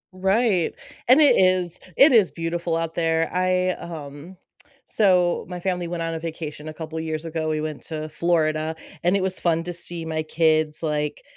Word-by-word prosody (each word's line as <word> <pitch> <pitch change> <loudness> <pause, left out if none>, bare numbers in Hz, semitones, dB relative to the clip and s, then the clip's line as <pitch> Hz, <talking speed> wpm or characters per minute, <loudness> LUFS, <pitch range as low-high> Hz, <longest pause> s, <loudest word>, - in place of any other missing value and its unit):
Right, 195 -1 +1 0.3
and 255 +4 +7
it 290 - +6
is 185 -2 +2 0.2
it 285 - +7
is 215 -6 +5
beautiful 165 0 -2
out 165 0 -3
there. 165 -1 +1
I, 185 0 +2
um 160 +1 -9 0.5
so 180 -4 +2
my 180 -1 -5
family 180 -1 -2
went 170 -1 -3
on 165 - -2
a 165 - -3
vacation 155 -2 -6
a 155 - -6
couple 160 0 -6
years 160 0 -4
ago, 160 -1 -2
we 155 -1 -1
went 155 -2 -5
to 155 -1 -5
Florida, 155 -1 0 0.3
and 180 +3 +2
it 190 - -1
was 190 -1 -1
fun 165 -1 +1
to 175 +1 -5
see 170 -1 -4
my 160 -1 -2
kids 155 -1 +1
like, 150 -1 -2
165 Hz, 185 wpm, -23 LUFS, 155-180 Hz, 0.5 s, and